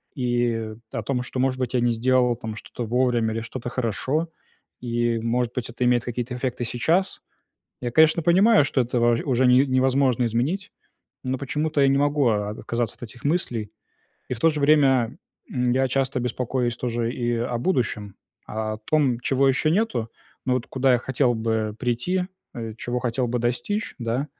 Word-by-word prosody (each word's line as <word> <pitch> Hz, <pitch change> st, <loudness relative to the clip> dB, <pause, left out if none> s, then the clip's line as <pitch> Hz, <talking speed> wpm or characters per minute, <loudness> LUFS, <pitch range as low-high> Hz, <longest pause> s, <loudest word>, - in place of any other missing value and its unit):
и 120 Hz, -4 st, 0 dB, 0.2 s
о 115 Hz, -, -3 dB
том, 125 Hz, +2 st, -1 dB
что, 125 Hz, -, -5 dB
может 130 Hz, 0 st, +1 dB
быть, 130 Hz, -1 st, -2 dB
я -, -, +3 dB
не 120 Hz, 0 st, +2 dB
сделал 125 Hz, +1 st, +2 dB
там 110 Hz, -1 st, -6 dB
что-то 120 Hz, -, -6 dB
вовремя 120 Hz, -1 st, +1 dB
или 115 Hz, -, -2 dB
что-то 120 Hz, +2 st, -6 dB
хорошо. 130 Hz, +7 st, -1 dB, 0.5 s
И, 120 Hz, -1 st, 0 dB
может 120 Hz, +1 st, -1 dB
быть, 125 Hz, -2 st, -3 dB
это 120 Hz, +1 st, -2 dB
имеет 120 Hz, -1 st, +3 dB
какие-то 120 Hz, +1 st, -4 dB
эффекты 125 Hz, -1 st, -2 dB
сейчас. 165 Hz, -, 0 dB, 0.6 s
Я, 120 Hz, -, -2 dB
конечно, 160 Hz, +5 st, +4 dB
понимаю, 190 Hz, +3 st, +5 dB
что 135 Hz, -2 st, +1 dB
это 120 Hz, 0 st, -1 dB
во 120 Hz, 0 st, +4 dB
уже 130 Hz, -1 st, +2 dB
не 125 Hz, +2 st, +6 dB
невозможно 130 Hz, -1 st, +2 dB
изменить, 145 Hz, -, -1 dB, 0.5 s
но 130 Hz, +1 st, -1 dB
почему-то 150 Hz, +3 st, -2 dB
я 140 Hz, -, +5 dB
не 135 Hz, -, +3 dB
могу 145 Hz, -1 st, +2 dB
о 105 Hz, -2 st, 0 dB
о -, -, -3 dB
отказаться 115 Hz, +1 st, -3 dB
от -, -, -12 dB
этих 120 Hz, +1 st, -10 dB
мыслей. 120 Hz, -, -1 dB, 0.6 s
И -, -, -2 dB
в 115 Hz, -, -11 dB
то 165 Hz, -, +5 dB
же 155 Hz, -, -4 dB
время, 135 Hz, -5 st, +4 dB, 0.3 s
м, 125 Hz, -1 st, 0 dB
я 130 Hz, +1 st, +2 dB
часто 135 Hz, 0 st, 0 dB
беспокоюсь 125 Hz, 0 st, -1 dB
тоже 120 Hz, -1 st, -2 dB
и 120 Hz, -2 st, -1 dB
о 120 Hz, +1 st, -2 dB
будущем. 115 Hz, -, -1 dB, 0.3 s
О 110 Hz, 0 st, -3 dB
том, 130 Hz, +1 st, +1 dB
чего 135 Hz, +2 st, +2 dB
еще 135 Hz, +4 st, +2 dB
нету, 165 Hz, -, 0 dB, 0.4 s
но 130 Hz, -, +2 dB
вот 125 Hz, -2 st, -2 dB
куда 130 Hz, 0 st, +2 dB
я -, -, +3 dB
хотел 130 Hz, 0 st, +1 dB
бы 110 Hz, -1 st, -1 dB
прийти, 125 Hz, +10 st, 0 dB, 0.3 s
э, 115 Hz, -2 st, -5 dB
чего 120 Hz, +1 st, -3 dB
хотел 125 Hz, 0 st, -1 dB
бы 120 Hz, +1 st, -1 dB
достичь, 125 Hz, -, -2 dB
да. 120 Hz, +3 st, -1 dB
125 Hz, 185 wpm, -24 LUFS, 115-135 Hz, 0.6 s, не